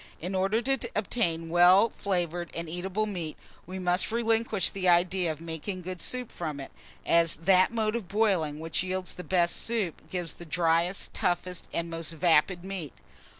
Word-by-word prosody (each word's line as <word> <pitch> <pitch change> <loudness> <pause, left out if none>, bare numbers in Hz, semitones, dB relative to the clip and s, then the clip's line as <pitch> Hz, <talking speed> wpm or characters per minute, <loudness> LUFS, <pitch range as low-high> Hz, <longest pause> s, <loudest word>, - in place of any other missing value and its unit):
In 180 +4 -4
order 195 +5 +1
to 270 -2 -1
obtain 170 -6 0
well 180 +6 +6
flavoured 175 -3 -2
and 170 0 -3
eatable 185 +5 -2
meat, 175 -7 -5 0.3
we 185 +1 -6
must 180 +1 0
relinquish 225 -3 +1
the 185 -2 +1
idea 175 0 +3
of 155 - -7
making 165 +3 -5
good 185 0 -6
soup 250 -2 -4
from 155 -4 -4
it, 135 - -8 0.3
as 170 -1 +4
that 185 +4 +4
mode 220 -1 0
of 225 -6 -4
boiling 190 -8 +1
which 160 0 -1
yields 185 0 -3
the 180 - -8
best 175 -2 +2
soup 200 -9 -3
gives 175 -2 -3
the - - -11
driest, 170 +3 +1
toughest, 180 -2 -1
and 170 0 -3
most 165 0 -3
vapid 170 +2 +3
meat. 185 -8 -5
180 Hz, 170 wpm, -28 LUFS, 165-195 Hz, 0.3 s, well